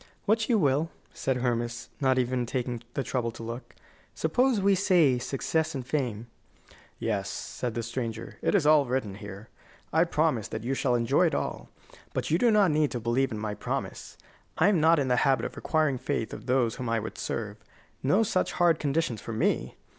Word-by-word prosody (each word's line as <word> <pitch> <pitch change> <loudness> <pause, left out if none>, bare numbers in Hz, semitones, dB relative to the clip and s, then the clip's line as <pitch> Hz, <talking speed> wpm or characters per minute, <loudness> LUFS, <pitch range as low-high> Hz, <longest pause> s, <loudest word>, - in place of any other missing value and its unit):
"What 220 +2 +2
you 235 - +4
will," 150 -2 +2 0.2
said 130 -1 -1
Hermas, 120 -1 -2
not 130 -2 +2
even 125 -1 0
taking 125 -2 -2
the 135 - 0
trouble 125 -3 -1
to 115 - -9
look. 115 +3 -7 0.4
"Suppose 255 -3 +2
we 200 +1 +4
say 175 -9 +4
success 155 +5 -1
and 130 -2 -4
fame?" 120 -6 -2 0.7
"Yes," 100 -4 -2
said 120 -3 -4
the 115 - -2
stranger; 115 -1 -5
"it - - +1
is 175 -7 +3
all 150 -2 +6
written 120 -5 -1
here. 100 +1 -9 0.4
I 160 +2 +5
promise 155 -9 +1
that 110 - -5
you 130 +3 -1
shall 130 -2 +1
enjoy 130 +9 +3
it - - -1
all. - - -3 0.5
But - - -2
you 165 - +3
do 240 - +4
not 210 -6 +4
need 150 -1 +2
to 120 - -2
believe 120 +4 +1
in 110 - -3
my 105 0 -3
promise. - - -5 0.4
I 170 +5 +5
am 185 -6 +3
not 165 +1 +5
in 140 -3 +1
the 125 -1 +2
habit 135 0 +2
of - - -5
requiring 155 -5 +1
faith 110 - -2
of - - -9
those 125 -3 +2
whom 125 -2 -3
I 115 0 +1
would 110 0 -7
serve. 105 -2 -3 0.4
No 185 +12 +3
such 200 -4 0
hard 175 -2 +3
conditions 140 -6 -1
for 115 - -6
me! 65 - 0
130 Hz, 200 wpm, -28 LUFS, 115-160 Hz, 0.7 s, all